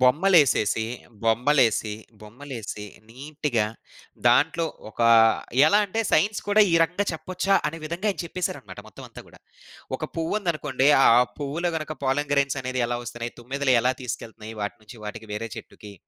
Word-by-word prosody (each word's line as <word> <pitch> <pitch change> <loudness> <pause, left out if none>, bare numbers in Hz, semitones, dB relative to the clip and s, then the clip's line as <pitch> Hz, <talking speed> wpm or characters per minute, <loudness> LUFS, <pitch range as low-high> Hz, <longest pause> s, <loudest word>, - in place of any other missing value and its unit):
బొమ్మలేసేసి, 130 - +4 0.4
బొమ్మలేసి 115 -1 +2 0.3
బొమ్మలేసి 110 -2 -8 0.2
నీట్‌గా 135 -1 -2 0.6
దాంట్లో 160 +7 +3 0.2
ఒకా, 115 +1 +1 0.6
ఎలా 205 - +5
అంటే 225 +4 -2
సైన్స్ 205 +7 +2
కూడా 205 +1 +4
ఈ - - +4
రకంగా 180 +5 0
చెప్పొచ్చా! 180 +5 -1
అనే 165 - -7
విధంగా 170 +6 -4
ఆయన 195 - -6
చెప్పేసారనమాట. 175 0 -5
మొత్తం - - -12
అంతా - - -11
గూడా. - - -18 0.6
ఒక - - -4
పువ్వుందనుకోండి 160 -6 -1 0.2
ఆ - - +5 0.3
పువ్వులో 150 +5 -2
గనక 155 0 -4
పాలన్ 140 +2 0
గ్రైన్స్ 140 -1 +1
అనేదెలా 125 -2 -1
వస్తున్నాయి, 120 0 -6
తుమ్మెదెలు 135 +2 0
ఎలా 125 +2 +2
తీసుకెళ్తున్నాయి 115 -2 -7
వాటినుంచి 105 +3 -7
వాటికి 105 +1 -7
వేరే 115 +2 -4
చెట్టుకి. 105 -1 -11
140 Hz, 135 wpm, -24 LUFS, 115-165 Hz, 0.6 s, ఎలా